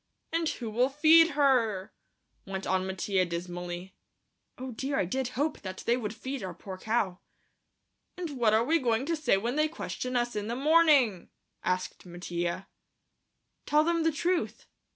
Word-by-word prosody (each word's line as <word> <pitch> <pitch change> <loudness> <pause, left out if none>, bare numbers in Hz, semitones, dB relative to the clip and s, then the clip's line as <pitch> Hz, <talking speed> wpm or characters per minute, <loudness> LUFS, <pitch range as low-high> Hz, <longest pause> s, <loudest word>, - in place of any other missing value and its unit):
"And 330 -1 +1
who'll 240 +2 0
feed 315 +3 +6
her?" 245 -9 +2 0.5
went 190 0 -4
on 190 0 0
Mattia 190 0 0
dismally. 175 +1 -5 0.6
Oh, 260 0 -6
dear, 270 +4 -2
I - - +2
did 260 +8 -2
hope 295 +2 -1
that 185 -1 -7
they 235 - +3
would 220 -3 -4
feed 265 +1 -5
our 190 -1 -5
poor 190 -2 -8
cow. 210 -5 -1 1.0
"And 350 -4 -4
what 225 -3 +4
are 225 - +3
we 325 +7 +2
going 240 -1 +1
to 330 +2 0
say 295 -10 +2
when 235 +7 -2
they 305 0 +3
question 255 -5 -5
us 240 -1 0
in 210 0 -3
the 235 - -2
morning?" 285 - +4 0.3
asked 185 0 -2
Mattia. 175 0 -4 1.0
"Tell 300 +1 +4
them 335 +1 +1
the 325 0 +2
truth." 345 +3 -1
240 Hz, 160 wpm, -29 LUFS, 190-295 Hz, 1.0 s, feed